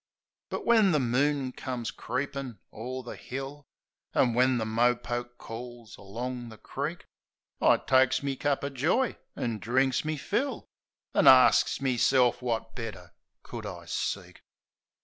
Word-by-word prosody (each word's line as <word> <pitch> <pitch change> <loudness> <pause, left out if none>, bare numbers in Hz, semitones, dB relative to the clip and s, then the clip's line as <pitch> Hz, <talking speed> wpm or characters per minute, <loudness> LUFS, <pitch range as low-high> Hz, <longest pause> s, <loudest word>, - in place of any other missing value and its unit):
But - - -4
when 220 -6 +5
the 150 - +3
moon 135 +2 +1
comes 125 -3 -4
creepin' 130 -2 -4 0.2
o'er 125 +4 -5
the 120 - -7
hill, 135 +2 -7 0.5
An' 120 - +3
when 125 +1 +3
the 110 - -1
mopoke 120 +1 0
calls 120 -1 -9
along 120 +4 -6
the 110 - -11
creek, - - -5 0.6
I - - +6
takes 130 +1 +3
me 140 -1 -1
cup 140 +1 0
o' 140 - -1
joy 160 - +1 0.2
an' 115 -3 -2
drinks 130 +3 +1
me 155 0 -2
fill. 270 - -2 0.5
An' - - +4
arsts - - +6
meself 125 -1 +3
wot 115 -2 -2
better 95 -8 -7 0.3
could 115 -3 -7
I 85 -4 -8
seek. 85 - -4
125 Hz, 140 wpm, -28 LUFS, 115-135 Hz, 0.6 s, I